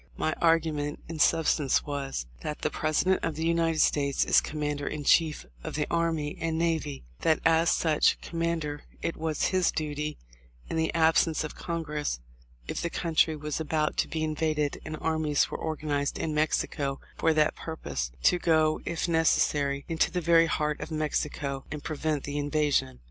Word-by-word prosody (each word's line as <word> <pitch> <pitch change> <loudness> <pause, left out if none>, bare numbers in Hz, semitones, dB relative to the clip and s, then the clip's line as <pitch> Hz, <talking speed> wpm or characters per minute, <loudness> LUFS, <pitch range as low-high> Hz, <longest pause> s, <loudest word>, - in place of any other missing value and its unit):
My 155 - 0
argument 155 -3 +2
in 165 -1 -6
substance 155 -3 +3
was: 140 - -3 0.2
That 150 - -5
the - - +1
President 155 +4 +1
of 165 -2 -1
the 160 +2 -2
United 165 -1 +2
States 140 -2 +2
is - - +5
Commander 150 -1 -3
in 150 -1 -3
Chief 155 - +3 0.2
of - - -5
the 150 -1 0
Army 165 -3 0
and 165 -1 -1
Navy; 160 - -1 0.2
that 160 -1 +2
as 165 +1 +4
such 155 -3 +3
com 165 - -6
mander 160 -3 -1 0.2
it 165 - -1
was 160 -2 -1
his 185 -2 +2
duty, 150 -1 -3 0.5
in - - -4
the 160 0 +1
absence 160 0 +3
of 155 - -5
Congress, 150 - -3 0.5
if - - -3
the 170 - -1
country 165 -2 +1
was 150 0 -4
about 155 -1 0
to - - +2
be 160 -1 -3
invaded 155 -1 -1
and 155 0 -5
armies 155 -2 +1
were - - -4
organized 150 -3 -2
in 155 - -2
Mexico 145 -2 0 0.2
for 165 - +2
that 150 -1 +3
purpose, 70 - -4
to 180 - +4
go 160 -2 +3
1 - - -15
— - - -23
if 170 0 -1
necessary 145 -4 +2
— - - -32
into 165 -1 +1
the 180 +1 -2
very 165 -1 +5
heart 150 -1 -1
of - - -5
Mexico 150 -3 -2
and 150 -1 -6
prevent 155 -2 -2
the 145 +1 -3
invasion. 145 - 0
155 Hz, 180 wpm, -28 LUFS, 145-165 Hz, 0.5 s, is